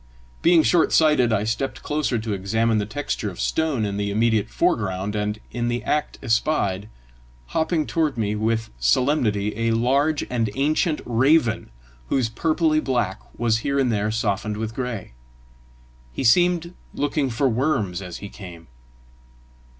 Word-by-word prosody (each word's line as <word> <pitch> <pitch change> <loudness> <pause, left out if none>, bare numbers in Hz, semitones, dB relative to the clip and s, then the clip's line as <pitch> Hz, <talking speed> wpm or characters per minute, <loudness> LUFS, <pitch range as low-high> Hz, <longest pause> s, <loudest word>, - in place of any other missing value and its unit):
Being 170 -2 +5
short 170 0 +3
sighted, 150 -7 +4
I 105 -2 +1
stepped 115 +5 -3
closer 150 -4 0
to 110 -1 -3
examine 110 +3 +1
the 105 - -2
texture 110 -2 -3
of 90 - -10
a - - -4
stone 155 -9 0
in 100 -1 -3
the 100 0 -1
immediate 110 +1 +1
foreground, 105 - 0
and 105 0 -2
in 120 0 -2
the 120 0 -2
act 150 0 -1
espied, 110 -5 0 0.6
hopping 160 -1 0
toward 155 -5 0
me 105 -2 0
with 110 +1 -1
solemnity, 105 - +1
a 115 +1 0
large 140 +6 +1
and 115 -3 -1
ancient 155 +4 +1
raven, 120 - +2 0.4
whose 125 -4 +1
purply 155 +4 +1
black 120 -9 -1 0.2
was 115 -1 +1
here 140 +4 -1
and 130 -3 +2
there 105 -1 0
softened 105 -1 -1
with 110 0 -4
gray. 120 - -5 1.0
He - - -4
seemed 175 +6 +3 0.2
looking 145 -1 0
for 125 +3 +1
worms 110 - 0
as 90 -3 -7
he 100 - -8
came. 90 -5 -11
115 Hz, 150 wpm, -23 LUFS, 105-145 Hz, 1.0 s, Being